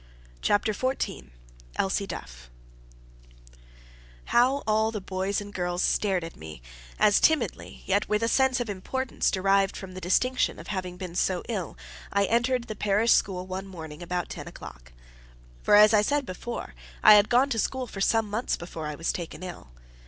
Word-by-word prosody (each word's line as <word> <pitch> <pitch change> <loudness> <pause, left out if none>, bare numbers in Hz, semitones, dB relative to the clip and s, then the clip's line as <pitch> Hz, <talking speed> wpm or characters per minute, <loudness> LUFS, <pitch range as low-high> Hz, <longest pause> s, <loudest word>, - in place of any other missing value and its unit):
CHAPTER 210 +1 +2
XIV 255 - -2 0.5
Elsie 195 +1 0
Duff - - -8 1.8
How 260 +4 +3
all 220 0 +2
the 220 -1 -4
boys 190 +1 -2
and 205 0 -9
girls 175 0 -1
stared 190 -4 +1
at 165 - -8
me, 80 -6 -10 0.3
as 210 -1 +5
timidly, 280 - 0
yet 200 +1 +1
with 210 +1 +1
a - - +2
sense 265 +1 +3
of 245 - -2
importance 235 +6 -2
derived 195 0 +2
from 190 -1 -8
the 185 - -8
distinction 250 +9 +1
of - - -10
having 185 -3 -4
been 180 -2 -6
so 180 0 0
ill, 195 -8 -4 0.3
I 200 0 +2
entered 240 +3 +1
the 215 - -7
parish 210 +3 +3
school 185 -2 0
one 190 +1 -5
morning, 160 -4 -9
about 175 0 -3
ten - - -7
o'clock! - - -11 0.7
For - - +4
as 210 +1 +7
I 210 - +6
said 285 +6 0
before, 235 +5 -6 0.3
I 215 - +10
had 205 0 +6
gone 255 +3 +4
to 225 - 0
school 260 +3 -1
for 200 -4 -8
some 225 +2 +2
months 215 +4 -1
before 165 -3 -6
I 150 - -4
was 165 +2 -1
taken 170 0 -6
ill. 175 - -8
200 Hz, 175 wpm, -27 LUFS, 180-225 Hz, 1.8 s, I